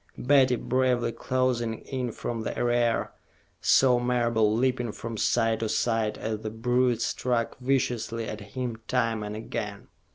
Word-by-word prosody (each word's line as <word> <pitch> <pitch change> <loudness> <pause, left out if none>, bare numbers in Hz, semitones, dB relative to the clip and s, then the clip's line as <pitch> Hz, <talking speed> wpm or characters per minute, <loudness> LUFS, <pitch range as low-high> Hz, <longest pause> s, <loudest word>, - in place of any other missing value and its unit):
Betty, 130 -1 +4
bravely 125 -1 +1
closing 120 -3 -1
in 130 -3 -3
from 115 +1 -4
the - - -4
rear, 120 -1 +1 0.5
saw 125 -2 +5
Marable 120 -3 +2
leaping 125 0 +1
from 115 +2 -6
side 115 +1 +1
to 110 - -2
side 110 -2 0
as 110 -1 -3
the 110 - -4
brute 120 +1 +1
struck 120 -1 -1
viciously 120 -3 0
at 105 - -6 0.2
him 120 -3 -3
time 115 -3 0
and 105 0 -5
again. 110 - -5
120 Hz, 140 wpm, -27 LUFS, 115-125 Hz, 0.5 s, saw